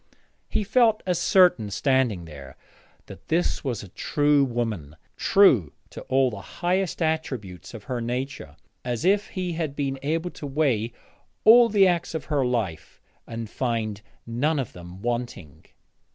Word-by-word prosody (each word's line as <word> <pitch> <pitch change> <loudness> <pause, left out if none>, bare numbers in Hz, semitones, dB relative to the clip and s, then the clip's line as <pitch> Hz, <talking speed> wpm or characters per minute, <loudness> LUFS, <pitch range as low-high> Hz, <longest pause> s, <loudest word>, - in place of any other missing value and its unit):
He 220 - 0
felt 225 0 +3
as 180 -2 0
certain, 180 - +4
standing 125 - +1
there, 70 -4 -11 0.5
that - - -13
this 170 +2 0
was 125 -8 -3
a - - -9
true 145 +8 +2
woman, 115 - -3 0.2
true 130 - +4 0.2
to - - -8
all 130 -1 +3
the 100 -3 -7
highest 180 - -1
attributes 130 - -3
of 110 - -9
her 125 0 -4
nature, 120 - -4 0.3
as 120 +3 -3
if 205 +2 +3
he 180 -2 -4
had 160 -4 -3
been 135 -2 -2
able 165 +4 -1
to 145 - -8
weigh 135 -6 0 0.5
all 230 +2 +8
the 200 -3 +5
acts 175 -2 -1
of 160 - -4
her 140 -2 +2
life 115 -10 -3 0.3
and 115 -1 -5
find 110 -3 -2 0.2
none 140 +7 0
of 130 -5 -3
them 90 +2 -11
wanting. 120 -11 -4
130 Hz, 150 wpm, -25 LUFS, 110-165 Hz, 0.5 s, all